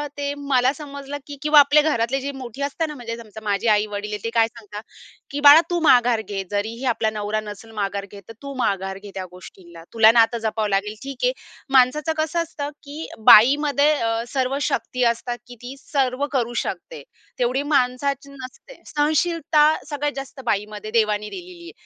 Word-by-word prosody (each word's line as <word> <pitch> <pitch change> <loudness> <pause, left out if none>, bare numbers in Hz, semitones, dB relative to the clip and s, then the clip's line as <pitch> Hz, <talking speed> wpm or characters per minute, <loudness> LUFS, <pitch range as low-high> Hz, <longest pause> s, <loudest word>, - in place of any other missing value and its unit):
अ, 295 - -3
ते 285 0 -2 0.2
मला 255 0 +3
समजलं 280 -1 -7
की 285 - -8
किंवा 300 -1 +7
आपले 290 +1 +5
घरातले 265 -3 0
जे 280 +1 -4
मोठी 265 0 -8
असतात 305 +3 -2
ना 300 - -7
म्हणजे 230 -3 -6
समजा 220 -2 -11
माझी 205 +2 -1
आई-वडील 210 0 0
आहे 210 0 -5
ते 230 - -2
काय 225 -1 +4
सांगतात 210 -2 -11 0.5
की 285 +1 -4
"बाळा 290 +3 +10
तू 345 -1 0
माघार 245 -6 +4
घे, 195 -1 -3
जरीही 220 +5 -3
आपला 220 -1 -1
नवरा 215 0 -2
नसेल 215 +1 -10
माघार 200 0 -3
घेत, 200 -1 -11
तर 225 - -10
तू 280 0 -7
माघार 195 -4 -1
घे 205 - -10
त्या 190 - -4
गोष्टींना. 170 -2 -14
तुला 225 0 +7
नातं 230 0 +3
जपावं 220 -1 -1
लागेल, 200 +2 -1
ठीक 275 -1 -7
आहे. - - +3 0.5
माणसाचं 300 +5 +2
कसं 335 +2 -1
असतं 295 -3 -6
की 290 +2 -10 0.3
बाईमध्ये 285 +5 +6
अ, 225 0 0
सर्व 265 +1 0
शक्ती - - -1
ती 250 - +3
असतात 240 +1 -6
की 245 - -11
ती 250 +2 -7
सर्व 275 -1 -1
करू 240 -2 -1
शकते, - - -5 0.4
तेवढी 250 +3 0
माणसाची 280 0 0
नसते. 280 - -12
सहनशीलता 310 +1 +1 0.3
सगळ्यात 290 0 -2
जास्त 270 0 -8
बाईमध्ये 210 -1 -3
देवाने 215 -2 +1
दिलेली 360 -2 -10
आहे. - - -16
250 Hz, 185 wpm, -22 LUFS, 215-285 Hz, 0.5 s, बाळा